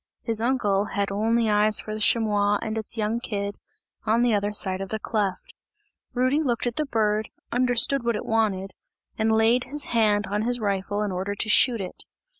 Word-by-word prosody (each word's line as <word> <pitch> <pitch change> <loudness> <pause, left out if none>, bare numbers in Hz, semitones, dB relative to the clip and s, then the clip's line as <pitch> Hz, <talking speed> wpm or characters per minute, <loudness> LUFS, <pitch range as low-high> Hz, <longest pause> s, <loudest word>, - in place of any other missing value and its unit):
His 225 -2 -1
uncle 210 -5 +1
had 200 -1 -2
only 225 +3 +1
eyes 210 0 +3
for 215 - -4
the 215 - -5
chamois 205 -2 +2
and 220 -1 -3
its 220 +1 -3
young 220 +2 -1
kid, 200 -4 -4 0.5
on 230 +3 +2
the 240 -2 +2
other 205 0 0
side 190 -2 0
of 195 - -5
the 220 - -2
cleft. 210 -3 -3 0.6
Rudy 255 +5 +2
looked 245 -6 0
at 240 -1 -3
the 305 -1 -1
bird, 215 -3 0 0.2
understood 250 +2 +2
what 235 -1 0
it - - -5
wanted, 200 -4 0 0.5
and 220 0 +2
laid 225 +3 +3
his 285 +3 -2
hand 210 -3 +2
on 205 +2 -2
his 245 +2 -1
rifle 205 0 -1
in 205 - -2
order 190 +3 -3
to 215 - -1
shoot 235 +2 +4
it. 185 - -7
215 Hz, 195 wpm, -25 LUFS, 205-235 Hz, 0.6 s, shoot